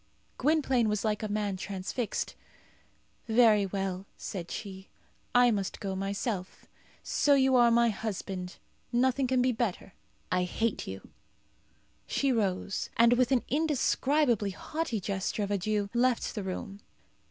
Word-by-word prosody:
Gwynplaine 265 -5 +2
was 210 +1 -1
like 210 -1 0
a 215 - -2
man 205 -2 -1
transfixed. 200 +4 -3 0.9
"Very 220 -3 +5
well," 195 0 -3
said 175 -4 -6
she; 190 -2 -7 0.5
"I 245 0 +6
must 200 -3 -2
go 195 -2 -3
myself. 195 0 -3 0.4
So 290 -1 +3
you 265 -1 +4
are 240 -1 +6
my 235 0 +4
husband. 195 -4 -4 0.3
Nothing 255 +2 +2
can 255 -1 +2
be 255 - +3
better. 220 -5 -3 0.4
I 180 0 +2
hate 225 +5 -2
you." 95 0 -8 1.0
She 275 -1 +1
rose, 200 -4 -1
and 235 +1 +6
with 250 +1 +2
an 255 -3 +3
indescribably 285 -6 +1
haughty 245 - -3
gesture 195 +2 -2
of 200 - -3
adieu 205 +1 0
left 245 0 +1
the 210 - -3
room. 195 +1 -5
215 Hz, 135 wpm, -29 LUFS, 195-245 Hz, 1.0 s, I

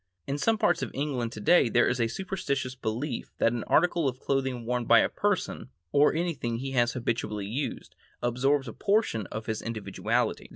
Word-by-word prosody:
In 140 +1 -3
some 225 +5 +2
parts - - +2
of - - -2
England 130 -5 -2
today 115 +6 +4
there 120 +1 +4
is 125 -1 0
a 115 - +3
superstitious 140 -4 -3
belief 125 +2 -3
that 115 - +2
an 120 - -3
article 170 -2 +3
of 130 0 -8
clothing 130 -4 -1
worn 125 0 -1
by - - +6
a - - +4
person, - - -1 0.2
or 145 +1 +5
anything 160 -9 -1
he 135 +3 -4
has 120 -2 +2
habitually 110 -4 -2
used, 130 +8 -4 0.2
absorbs 135 +3 +1
a 115 - -6
portion 200 - +1
of 110 0 -6
his 110 -1 -3
individuality. 115 -3 -2
125 Hz, 180 wpm, -28 LUFS, 115-145 Hz, 0.2 s, by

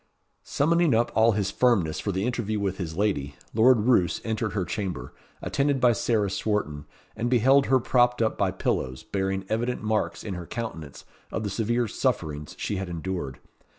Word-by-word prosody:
Summoning 165 -1 +2
up 115 +1 +2
all 110 +1 +5
his 100 -2 -1
firmness 100 -11 +2
for 100 - -2
the 95 +2 -1
interview 115 -4 -1
with 95 -2 -2
his 80 -3 -4
lady, 75 -9 0 0.2
Lord 115 +1 +5
Roos 105 -6 +3
entered 110 -2 -2
her 95 -4 -1
chamber, 90 - -4 0.3
attended 140 -1 +1
by 125 -2 +5
Sarah 110 -4 0
Swarton, 75 -10 -2 0.3
and 115 +2 -1
beheld 135 +3 +4
her 130 0 +4
propped 125 0 +2
up 110 -1 +1
by 100 - +1
pillows, 65 -8 -2
bearing 95 -1 -2
evident 120 +2 -1
marks 110 0 -1
in 100 - -4
her 90 -2 -6
countenance 80 -11 -6 0.3
of 110 - -3
the 100 - -3
severe 120 +3 0
sufferings 75 -6 -2
she 105 - -2
had 95 -1 -4
endured. 85 -5 -4
105 Hz, 175 wpm, -26 LUFS, 95-120 Hz, 0.3 s, all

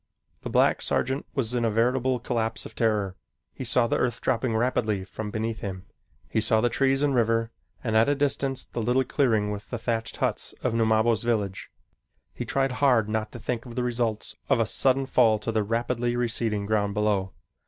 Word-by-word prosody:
The - - -5
black - - +3
sergeant 135 +2 0
was 125 -3 -1
in 120 -1 0
a 115 - +2
veritable 125 +3 +1
collapse 115 -1 -2
of - - -9
terror. 105 -4 0 0.4
He - - -6
saw 125 0 +3
the - - 0
earth 120 -2 0
dropping 115 -1 0
rapidly 110 -4 0
from 105 +2 -6
beneath 110 +1 -3
him. 95 -1 -6 0.4
He 110 - 0
saw 110 0 +4
the 120 +2 +2
trees 135 +2 +2
and 145 -1 +2
river 115 -1 +1 0.3
and 110 -3 -1
at 110 +5 +5
a 145 - +2
distance 140 -2 0
the 120 - -5
little 125 +4 +2
clearing 110 -8 +1
with 105 0 -7
the 120 - -3
thatched 115 -1 -2
huts - - -2
of - - 0
Numabo's 110 0 +2
village. 105 -5 -2 0.6
He - - -5
tried 135 -1 +1
hard 125 -7 +4
not 110 0 -2
to 120 - -7
think 120 +2 -3
of 120 - -9
the 125 - -1
results 115 -3 -2
of - - +3
a 115 - +3
sudden 135 +4 +2
fall 115 -4 +4
to 105 +2 -3
the 110 -1 +1
rapidly 120 +2 -1
receding 115 -3 -1
ground 100 -1 0
below. 105 -3 0
115 Hz, 195 wpm, -26 LUFS, 110-125 Hz, 0.6 s, at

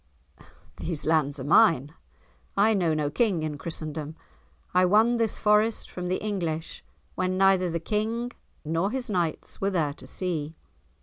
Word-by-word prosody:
"These 165 -4 -4
lands 155 -3 +1
are - - -4
mine. 150 - +4 0.6
I 215 +3 +5
know 170 -6 +1
no 150 -1 -1
King 190 -3 +1
in 150 -2 -4
Christendom. 155 -1 -5 0.6
I 180 +1 +5
won 220 +6 +4
this 225 -2 0
Forest 210 +1 +2
from 180 -1 -5
the 185 - 0
English 170 -6 -3 0.3
when 185 0 -1
neither 190 -1 +4
the 170 0 -2
King 220 +6 -2 0.3
nor 165 +5 0
his 250 -1 -3
knights 170 -5 -2
were 195 - +2
there 160 -7 0
to - - -13
see." 160 -4 -2
180 Hz, 150 wpm, -26 LUFS, 155-210 Hz, 0.6 s, I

